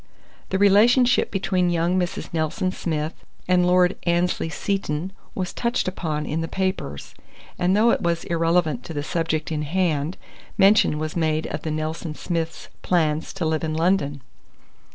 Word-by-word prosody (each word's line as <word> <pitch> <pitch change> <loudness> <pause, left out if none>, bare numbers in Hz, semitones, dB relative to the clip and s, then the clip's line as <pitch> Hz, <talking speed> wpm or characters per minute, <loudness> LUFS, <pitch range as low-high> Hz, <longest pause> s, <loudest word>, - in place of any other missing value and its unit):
The 190 - 0
relationship 230 +6 +5
between 185 -2 0
young 170 +1 +1
Mrs. 180 -2 -2
Nelson 170 +4 -1
Smith 155 -3 -3 0.3
and 180 -1 +3
Lord 180 0 +4
Annesley 175 -1 0
Seton 190 -1 -2 0.2
was 185 -1 -3
touched 235 -3 -1
upon 155 -5 -2
in 160 +2 -2
the 165 - -2
papers; 185 - -3 0.5
and 185 +3 +2
though 230 +2 +5
it - - 0
was 170 -1 0
irrelevant 165 -5 +1
to 165 - -7
the 145 - -2
subject 160 0 -2
in 155 -1 -1
hand, 160 0 0 0.4
mention 195 -5 +5
was 155 0 -4
made 160 -2 0
of 150 - -4
the 160 - -4
Nelson 155 +1 -3
Smiths' 165 -1 -4
plan 155 -4 +2
to 170 +2 -5
live 160 0 0
in 155 -1 -2
London. 155 -5 +1
170 Hz, 155 wpm, -23 LUFS, 155-185 Hz, 0.5 s, relationship